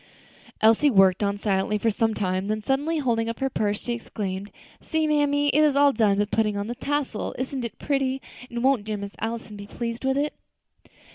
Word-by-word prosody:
Elsie 225 +7 +5
worked 195 -5 +5
on 200 0 0
silently 200 0 0
for 225 +2 +1
some 225 +1 0
time, 185 -1 -1
then 215 0 -2
suddenly 285 +7 0
holding 230 -5 0
up 230 - -4
her 270 0 -1
purse, 205 -2 0
she 240 - -2
exclaimed, 200 -4 -5 0.3
"See, 320 -1 0
mammy, 290 -1 +2
it 300 - +3
is 295 -2 +3
all 285 0 +5
done 210 -4 +3
but 205 0 0
putting 215 -2 +1
on 200 - -2
the 235 - -3
tassel! 280 -3 -2
Isn't 260 0 -3
it 235 - -6
pretty? 270 -2 0 0.3
and 235 0 -4
won't 265 -5 +3
dear 215 0 -3
Miss 200 0 -7
Allison 225 -1 -4
be 200 0 -9
pleased 230 +3 -5
with 265 0 +1
it?" 295 +1 0
230 Hz, 205 wpm, -25 LUFS, 205-275 Hz, 0.3 s, Elsie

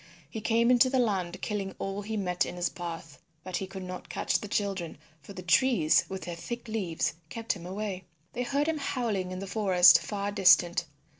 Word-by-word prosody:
He 215 +9 -7
came 230 +2 +3
into 250 +1 +5
the 260 - +1
land 195 -8 0
killing 200 -2 -3
all 195 +1 -4
he 220 +2 -4
met 180 -3 0
in - - -5
his 175 0 0
path. 165 -3 -7 0.2
But 185 -1 -3
he 190 - -4
could 190 0 -8
not 185 0 -8
catch - - 0
the 210 - -7
children, 195 -5 -2 0.2
for 145 - -11
the 185 -1 -8
trees 180 -4 +3
with 190 0 -5
their 175 - -5
thick 235 +9 -6
leaves 195 -7 -1 0.2
kept 230 0 -2
him 175 -3 -9
away. 190 -1 -4 0.3
They 245 - -3
heard 280 +4 0
him 320 -2 -1
howling 225 -9 -2
in 185 - -5
the 195 - -5
forest 185 -3 +5
far 205 -1 -3
distant. 180 -3 +4
195 Hz, 205 wpm, -29 LUFS, 180-220 Hz, 0.3 s, into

